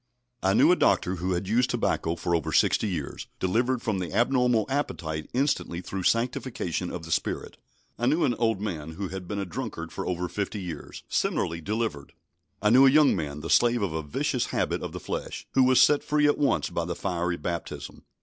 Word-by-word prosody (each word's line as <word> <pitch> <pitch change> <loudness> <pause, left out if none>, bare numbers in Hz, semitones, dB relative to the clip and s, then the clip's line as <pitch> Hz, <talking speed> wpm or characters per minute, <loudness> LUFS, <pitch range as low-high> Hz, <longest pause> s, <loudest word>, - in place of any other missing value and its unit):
I 95 +1 +2
knew - - +6
a - - +6
doctor, 90 +1 +2
who 90 +2 -1
had 90 +2 -2
used 120 +4 +2
tobacco 80 +1 0
for 85 +1 -2
over 80 - -1
sixty 110 - +3
years, 80 -8 -4
delivered 120 +6 +1
from 105 -4 -1
the 90 - -4
abnormal 120 0 +3
appetite 80 - -3
instantly 130 -9 0
through 95 +1 -5
sanctification 115 -5 -1
of 90 - -6
the 80 - -8
Spirit. - - -2 0.4
I 120 - +1
knew 155 +5 +3
an 130 -5 +2
old 115 -3 0
man, 80 -7 -4
who 95 +2 -4
had 95 0 -6
been 100 - -4
a 100 - -2
drunkard 95 -5 -5
for - - -5
over 90 0 -1
fifty 100 +3 -3
years, 90 -4 -7
similarly 85 0 -1
delivered. 105 -7 -3 0.5
I 105 - +4
knew 130 +3 +8
a - - +8
young 150 +1 +5
man, 75 -4 -4
the 80 - -6
slave 120 -2 +4
of 90 -5 -1
a 80 - -2
vicious 75 -2 -1
habit - - -1
of - - -5
the - - -6
flesh, - - -5
who 130 - +4
was 130 0 +5
set 145 -1 +5
free 150 0 +2
at 145 - +3
once 145 - +1
by 85 - -1
the 85 0 -3
fiery 90 -1 -2
baptism. 85 +2 -5
95 Hz, 205 wpm, -27 LUFS, 85-120 Hz, 0.5 s, knew